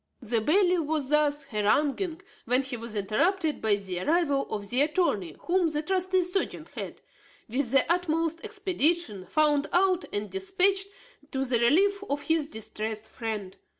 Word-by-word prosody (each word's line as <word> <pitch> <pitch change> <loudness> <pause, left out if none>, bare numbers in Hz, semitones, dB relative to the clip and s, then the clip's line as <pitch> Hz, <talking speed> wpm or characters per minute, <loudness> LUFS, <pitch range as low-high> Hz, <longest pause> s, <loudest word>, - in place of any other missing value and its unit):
The 230 -2 0
bailiff 360 - +3
was 300 -4 -1
thus 295 -1 +2
haranguing 290 - 0 0.2
when 250 +3 +3
he 265 -1 -5
was 230 -1 -7
interrupted 305 - 0
by 215 -2 +3
the 190 -3 -5
arrival 290 - +1
of 205 -1 -5
the 250 +3 +3
attorney 290 - 0
whom 355 -1 +2
the 300 0 -2
trusty 370 +1 +1
serjeant 360 +3 -3
had, - - -6 0.5
with 250 +2 -1
the 270 +2 +4
utmost 330 -1 0
expedition, 345 - 0
found 300 -1 +2
out 370 0 +2
and 205 0 -3
dispatched 385 0 +1 0.4
to 270 0 -1
the 245 -2 +2
relief 390 +12 +3
of 285 +1 -2
his 320 -2 +2
distressed 220 -3 -5
friend. 215 -5 -5
300 Hz, 150 wpm, -27 LUFS, 230-360 Hz, 0.5 s, the